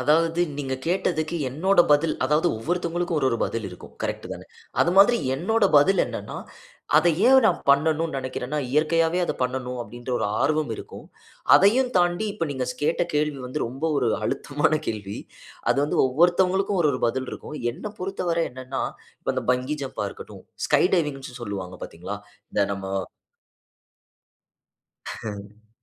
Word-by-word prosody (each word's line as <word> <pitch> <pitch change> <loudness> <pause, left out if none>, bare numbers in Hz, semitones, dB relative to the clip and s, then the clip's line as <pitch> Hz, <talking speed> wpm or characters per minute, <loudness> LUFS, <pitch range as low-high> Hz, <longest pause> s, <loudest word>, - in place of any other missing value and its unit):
அதாவது 165 +5 +2 0.2
நீங்க 135 -2 -2
கேட்டதுக்கு 170 -2 0
என்னோட 175 +8 +3
பதில். 155 +2 +3
அதாவது 150 +5 +3
ஒவ்வொருத்தவங்களுக்கும் 175 +5 -1
ஒவ்வொரு 130 -4 +1
பதில் 115 -3 -3
இருக்கும் 90 - -12
கரெக்ட் - - -3
தானே? - - -9 0.3
அது 170 - +4
மாதிரி 220 +5 +7 0.2
என்னோட 205 +9 +1
பதில் 190 +7 +5
என்னன்னா, - - -6 0.6
அதை 175 - +5 0.2
ஏன் 265 0 +8
நான் - - +2
பண்ணணும்ன்னு 160 +2 +2
நினைக்கிறேன்னா, 130 +2 -4
இயற்கையாவே 165 +3 +2
அத - - -2
பண்ணணும் 125 0 -2
அப்படின்ற 120 +2 -9
ஒரு - - 0
ஆர்வம் 155 -4 +1
இருக்கும். - - -10 0.5
அதையும் 245 +6 +4
தாண்டி 175 +4 +1
இப்போ 165 - -2
நீங்க 130 -2 -3
ஸ் 125 - -20
கேட்ட 165 +3 +2
கேள்வி 150 -1 0
வந்து 130 +4 -2
ரொம்ப 135 +7 -6
ஒரு 120 - +1 0.2
அழுத்தமான 145 +4 0 0.2
கேள்வி. 105 -2 -4 0.5
அது - - +3
வந்து 150 - -1
ஒவ்வொருத்தவங்களுக்கும் 180 +6 +2
ஒரு 150 - +4
ஒரு 125 - -4
பதில் 130 +2 -3
இருக்கும். 150 - -7 0.2
என்ன 210 - -7
பொறுத்தவரை 180 -3 -1
என்னன்னா 130 +1 -4 0.4
இப்போ - - -1
அந்த - - -2
பங்கி 130 +4 -2
ஜம்ப்பா 135 - -4
இருக்கட்டும் - - -11 0.2
ஸ்கை - - +4
டைவிங்ன்னு 135 -7 -2
சொல்லுவாங்க 95 -4 -5
பார்த்தீங்களா? 90 +5 -7 0.3
இந்த - - 0
நம்ம 95 0 -7 2.2
ம். 105 0 -8
150 Hz, 145 wpm, -24 LUFS, 125-175 Hz, 2.2 s, ஏன்